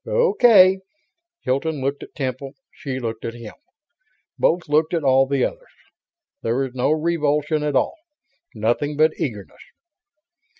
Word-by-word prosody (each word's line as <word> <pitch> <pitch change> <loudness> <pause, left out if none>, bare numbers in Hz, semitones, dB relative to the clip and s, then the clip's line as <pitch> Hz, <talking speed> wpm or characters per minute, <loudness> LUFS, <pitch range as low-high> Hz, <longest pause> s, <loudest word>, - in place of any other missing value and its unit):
"Okay." 245 - +5 0.6
Hilton 145 +4 -1
looked 140 +2 -2
at - - -12
Temple; 135 0 -4 0.2
she 130 -2 -6
looked 115 -2 -5
at 115 - -5
him; 115 -3 -10 0.8
both 175 +1 +1
looked 155 +3 +1
at 165 - -1
all 135 0 +4
the 140 0 0
others. - - -7 0.7
There 115 +2 -1
was 135 -2 -2
no 125 +1 0
revulsion 155 -1 0
at 150 -2 -1
all. 330 - +1 0.6
Nothing 120 +7 -1
but 155 +1 +4
eagerness. 105 -8 -5
145 Hz, 135 wpm, -21 LUFS, 130-160 Hz, 0.8 s, Okay